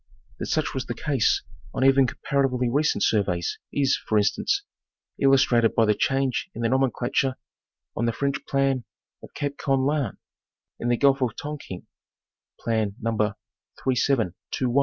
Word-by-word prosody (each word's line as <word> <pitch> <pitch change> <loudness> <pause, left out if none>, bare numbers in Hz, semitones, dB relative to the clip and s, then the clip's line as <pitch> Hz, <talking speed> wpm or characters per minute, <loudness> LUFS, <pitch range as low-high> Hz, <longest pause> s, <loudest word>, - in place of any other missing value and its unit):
That - - -3
such - - 0
was - - -3
the - - -3
case 140 -6 +1 0.3
on - - 0
even 135 -1 +5
comparatively 125 -2 0
recent 150 +4 +2
surveys 90 -5 0
is, 140 -2 +2
for 110 - +2
instance, 400 - +1 0.6
illustrated 130 -4 +4
by 115 - +4
the 105 - +4
change 135 +3 0
in 115 - -4
the 115 - +2
nomenclature 130 0 +1 0.6
on 115 - 0
the - - +2
French 140 +3 -2
plan 135 -2 +1 0.4
of - - -14
Cape 145 -1 -3
Koan 135 -1 +1
Lan, 145 -7 -1 0.6
in 120 - -1
the 120 - +3
Gulf 140 0 +3
of 120 -4 0
Tongking 145 -11 -7 0.7
(Plan 110 -3 -1
No. 110 -2 0
130 Hz, 140 wpm, -25 LUFS, 115-135 Hz, 0.7 s, even